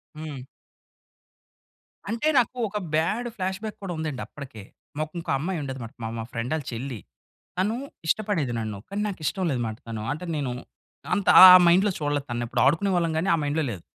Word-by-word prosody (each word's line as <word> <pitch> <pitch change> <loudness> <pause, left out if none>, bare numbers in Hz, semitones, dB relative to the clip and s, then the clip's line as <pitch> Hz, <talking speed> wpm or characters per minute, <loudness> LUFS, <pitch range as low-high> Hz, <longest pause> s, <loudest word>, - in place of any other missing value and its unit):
హ్మ్. 150 -4 -7 1.6
అంటే 230 +7 -1
నాకు 250 +1 -1
ఒక 210 - -4 0.2
బ్యాడ్ 210 +10 0
ఫ్లాష్‌బ్యాక్ 195 +2 -4
కూడా 185 -2 -3
ఉందండి 155 -4 -3
అప్పటికే. 130 -8 -10 0.3
మాకు 155 0 -2
ఇంకో 165 - -4
అమ్మాయి 175 +3 -2
ఉండేదనమాట, 130 -5 -6
మా - - -2
మా - - -3
ఫ్రెండ్ 115 +1 -4
ఆళ్ళ 155 -4 -4
చెల్లి. 120 0 -5 0.6
తను 200 +5 +1 0.3
ఇష్టపడేది 175 - 0
నన్ను. 110 -2 -4
కానీ, 200 +1 -3
నాకు 200 -4 -5
ఇష్టం 190 +4 -1
లేదనమాట 115 -4 -2
తను. 110 -2 -5
అంటే 160 +5 -7
నేను 140 -4 -2 0.6
అంత 200 -2 -1
ఆ! - - +13
ఆ - - +12
మైండ్‌లో 190 +4 +4
చూడలేదు 145 -2 -1
తనని. 120 0 -2
ఎప్పుడు - - 0
ఆడుకునే 165 +8 +3
వాళ్ళం 170 -2 +1
కానీ, 175 +5 0
ఆ - - +5
మైండ్‌లో 150 +2 0
లేదు. 90 -6 -8
155 Hz, 175 wpm, -25 LUFS, 130-190 Hz, 1.6 s, ఆ